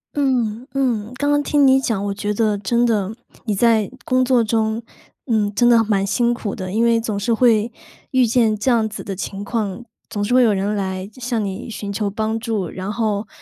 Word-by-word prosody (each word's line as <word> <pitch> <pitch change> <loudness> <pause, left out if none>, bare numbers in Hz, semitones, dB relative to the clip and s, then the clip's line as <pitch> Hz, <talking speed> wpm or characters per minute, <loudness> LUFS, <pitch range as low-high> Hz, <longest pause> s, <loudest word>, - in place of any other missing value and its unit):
嗯， 250 -4 0
嗯， 240 -5 0
刚 285 +3 0
刚 290 - +3
听 290 -1 +3
你 265 0 +5
讲， 205 -6 -1
我 200 - -1
觉 205 +1 -3
得 215 -1 +2
真 235 +4 +1
的， 210 -4 0 0.3
你 215 -3 0
在 220 -1 +3 0.2
工 255 0 +2
作 250 -2 +3
中， 220 +1 0 0.4
嗯， 215 -5 +1
真 240 +4 +4
的 235 -2 +5
蛮 200 -2 +1
辛 240 +4 +1
苦 215 -4 -4
的， 185 -1 -5
因 220 +4 +1
为 230 -1 +3
总 215 -3 -3
是 230 +4 0
会 225 -1 +3 0.4
遇 255 -2 +3
见 225 -2 +3
这 215 +5 -1
样 230 -3 +3
子 215 - -7
的 195 - -5
情 195 +1 -5
况， 215 0 -3 0.3
总 205 -2 -2
是 245 +5 +1
会 255 - +6
有 220 -3 +4
人 200 +2 -1
来 190 -1 -3
就 215 +5 -17
向 235 -3 -1
你 195 +3 -5
寻 210 -3 -5
求 200 0 -2
帮 220 +2 -2
助， 215 -6 -2
然 190 +3 -5
后 215 -2 -1
220 Hz, 235 characters per minute, -20 LUFS, 205-240 Hz, 0.4 s, 会